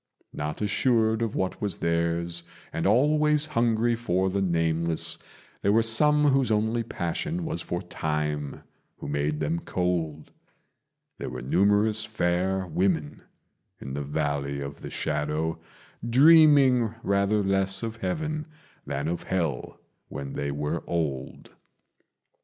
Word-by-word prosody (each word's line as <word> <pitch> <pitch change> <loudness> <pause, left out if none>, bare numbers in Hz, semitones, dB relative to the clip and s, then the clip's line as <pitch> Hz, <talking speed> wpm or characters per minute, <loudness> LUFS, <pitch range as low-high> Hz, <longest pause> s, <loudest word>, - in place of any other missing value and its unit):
Not 75 +7 -4
assured 110 +1 +2
of 115 -2 -2
what 95 -1 -2
was 100 -5 -2
theirs, 85 0 -1 0.3
and 80 - 0
always 150 +6 +3
hungry 115 -4 +1
for 95 -5 0
the 100 +1 -1
nameless, 85 -2 0 0.4
There 100 - +2
were 115 +2 +4
some 150 +6 +5
whose 135 -2 +2
only 110 +2 +1
passion 115 - -3
was 160 0 -3
for 85 +2 -4
Time 75 -4 -3 0.3
who - - -8
made 75 +1 -1
them 80 +2 -1
cold: 85 -4 -2 0.9
There - - -4
were - - -7
numerous 105 +8 +2
fair 95 -3 0
women 85 -4 -1 0.6
in 65 - -7
the 70 - -3
Valley 70 -1 -2
of 70 0 -7
the - - -7
Shadow, 75 +2 -2 0.5
Dreaming 135 -4 +6
rather 100 +1 +1
less 95 +2 +1
of 115 0 -4
heaven 155 - -3 0.4
than 70 +2 -2
of 85 +1 -2
hell 80 -8 -3 0.3
when 70 -1 -6
they 70 - -3
were 75 +3 -2
old. 75 -6 -3
95 Hz, 130 wpm, -26 LUFS, 80-115 Hz, 0.9 s, Dreaming